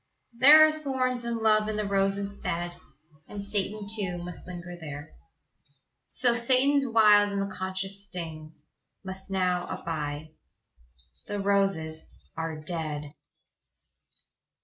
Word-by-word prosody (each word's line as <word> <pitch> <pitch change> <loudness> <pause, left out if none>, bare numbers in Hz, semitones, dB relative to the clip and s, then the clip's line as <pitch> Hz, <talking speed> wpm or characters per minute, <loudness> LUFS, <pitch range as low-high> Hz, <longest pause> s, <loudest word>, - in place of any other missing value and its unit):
There 305 +4 +9
are - - +1
thorns 260 -5 -2
and 235 -1 -1
love 215 -1 +3
in 215 - -2
the 210 0 -1
roses' 200 0 0
bed, 175 -3 -3 0.6
And 200 -1 -7
Satan 205 0 -2
too 200 -4 -2
Must 175 0 -8
linger 175 -1 -7
there; 150 -3 -8 1.0
So 240 -2 +3
Satan's 265 +4 +3
wiles 210 -3 +5
and 200 - -2
the 195 0 -3
conscience 190 +1 -2
stings, 155 -4 -7 0.4
Must 190 +1 -6
now 180 -2 0
abide 150 -2 -4 1.0
the 205 - -3
roses 195 -6 0 0.3
are 160 -1 -4
dead. 155 -2 -4
195 Hz, 120 wpm, -28 LUFS, 170-215 Hz, 1.0 s, There